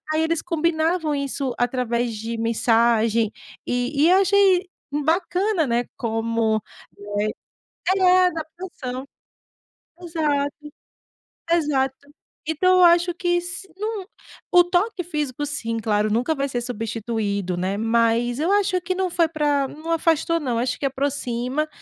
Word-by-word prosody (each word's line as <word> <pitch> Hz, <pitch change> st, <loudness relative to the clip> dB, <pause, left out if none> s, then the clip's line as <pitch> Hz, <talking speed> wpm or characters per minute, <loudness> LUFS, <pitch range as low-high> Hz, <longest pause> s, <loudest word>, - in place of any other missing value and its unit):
aí 315 Hz, -, +2 dB
eles 320 Hz, 0 st, 0 dB
combinavam 330 Hz, -1 st, 0 dB
isso 275 Hz, -2 st, -2 dB
através 245 Hz, -1 st, 0 dB
de 225 Hz, +2 st, -4 dB
mensagem 230 Hz, -1 st, +2 dB, 0.3 s
e 250 Hz, +4 st, 0 dB
e -, -, +5 dB
achei 390 Hz, -1 st, +4 dB, 0.4 s
bacana, 355 Hz, +2 st, +1 dB
né, 240 Hz, 0 st, +1 dB
como, 225 Hz, -1 st, 0 dB, 0.4 s
eh 205 Hz, 0 st, -2 dB, 0.8 s
é, 365 Hz, 0 st, +6 dB
adaptação. 315 Hz, -6 st, -5 dB, 0.9 s
Exato, 300 Hz, -5 st, -1 dB, 1.0 s
exato. 285 Hz, -4 st, 0 dB, 0.4 s
Então 365 Hz, +4 st, +3 dB
eu 360 Hz, -, +7 dB
acho 345 Hz, +1 st, +5 dB
que 350 Hz, 0 st, +1 dB
se 350 Hz, +2 st, -7 dB
não 420 Hz, -1 st, -4 dB, 0.5 s
o 355 Hz, -, +8 dB
toque 360 Hz, +2 st, 0 dB
físico, 295 Hz, -4 st, -3 dB
sim, 230 Hz, -6 st, -3 dB
claro, 210 Hz, -1 st, +1 dB
nunca 245 Hz, +8 st, +1 dB
vai 275 Hz, 0 st, -1 dB
ser 245 Hz, -2 st, -2 dB
substituído, 220 Hz, -5 st, -3 dB
né, 190 Hz, +3 st, -1 dB
mas 230 Hz, +2 st, +1 dB
eu 335 Hz, -, +1 dB
acho 405 Hz, -2 st, +2 dB
que 365 Hz, +1 st, -2 dB
não 370 Hz, -1 st, -1 dB
foi 335 Hz, -1 st, +2 dB
pra 295 Hz, -3 st, +1 dB
não 315 Hz, +2 st, -8 dB
afastou 330 Hz, 0 st, +2 dB
não, 245 Hz, -5 st, -1 dB
acho 250 Hz, +1 st, -1 dB
que 280 Hz, -, -1 dB
aproxima. 270 Hz, +1 st, -2 dB
285 Hz, 130 wpm, -23 LUFS, 235-345 Hz, 1.0 s, o